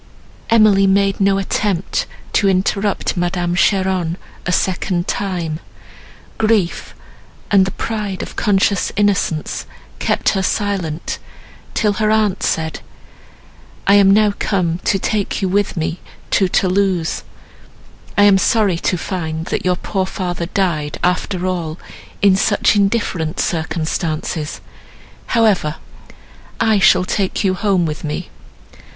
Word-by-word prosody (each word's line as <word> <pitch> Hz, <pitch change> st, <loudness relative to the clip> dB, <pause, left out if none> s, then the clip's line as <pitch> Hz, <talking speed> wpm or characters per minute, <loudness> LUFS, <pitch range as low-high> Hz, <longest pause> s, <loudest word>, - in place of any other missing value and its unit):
Emily 215 Hz, -3 st, +5 dB
made 195 Hz, 0 st, +2 dB
no 195 Hz, 0 st, +3 dB
attempt 195 Hz, -1 st, -1 dB, 0.3 s
to 200 Hz, -, +3 dB
interrupt 195 Hz, +2 st, 0 dB
Madame 175 Hz, 0 st, -1 dB
Cheron 185 Hz, -2 st, +1 dB, 0.3 s
a -, -, +1 dB
second 180 Hz, -1 st, 0 dB
time, 175 Hz, -5 st, -2 dB, 0.8 s
grief 215 Hz, -5 st, 0 dB, 0.6 s
and 195 Hz, -2 st, +5 dB
the 190 Hz, -, -3 dB
pride 210 Hz, -4 st, -3 dB
of -, -, -9 dB
conscious 200 Hz, -2 st, +1 dB
innocence 200 Hz, -6 st, 0 dB, 0.3 s
kept -, -, +1 dB
her 195 Hz, -, 0 dB
silent, 185 Hz, -5 st, -2 dB, 0.6 s
till 210 Hz, -2 st, +2 dB
her 215 Hz, -, +3 dB
aunt 215 Hz, -3 st, +2 dB
said, 160 Hz, -1 st, -1 dB, 1.1 s
"I 200 Hz, -, +5 dB
am 200 Hz, -1 st, +6 dB
now 210 Hz, +1 st, +4 dB
come 175 Hz, -4 st, 0 dB
to 195 Hz, -, +2 dB
take 205 Hz, +1 st, -1 dB
you 195 Hz, -, 0 dB
with 200 Hz, 0 st, 0 dB
me 165 Hz, +2 st, -2 dB, 0.3 s
to 195 Hz, -, +3 dB
Thoulouse; 185 Hz, -2 st, +1 dB, 1.0 s
I 205 Hz, -, +6 dB
am 200 Hz, -2 st, +6 dB
sorry 205 Hz, -4 st, +2 dB
to 180 Hz, -, 0 dB
find, 160 Hz, -3 st, -4 dB
that -, -, -1 dB
your 180 Hz, 0 st, +2 dB
poor 190 Hz, +1 st, -2 dB
father 175 Hz, -3 st, -3 dB
died, 170 Hz, -6 st, -1 dB
after 180 Hz, +1 st, 0 dB
all, 170 Hz, -4 st, -2 dB, 0.5 s
in 195 Hz, -2 st, +6 dB
such 205 Hz, +2 st, +2 dB
indifferent 195 Hz, -6 st, 0 dB
circumstances; 160 Hz, -1 st, -2 dB, 0.7 s
however, 210 Hz, -10 st, +2 dB, 0.8 s
I 220 Hz, -2 st, +3 dB
shall 190 Hz, -1 st, +5 dB
take 195 Hz, +1 st, -1 dB
you 190 Hz, -2 st, +2 dB
home 190 Hz, -2 st, +1 dB
with 155 Hz, -1 st, -4 dB
me. 150 Hz, -1 st, -4 dB
190 Hz, 125 wpm, -18 LUFS, 175-200 Hz, 1.1 s, am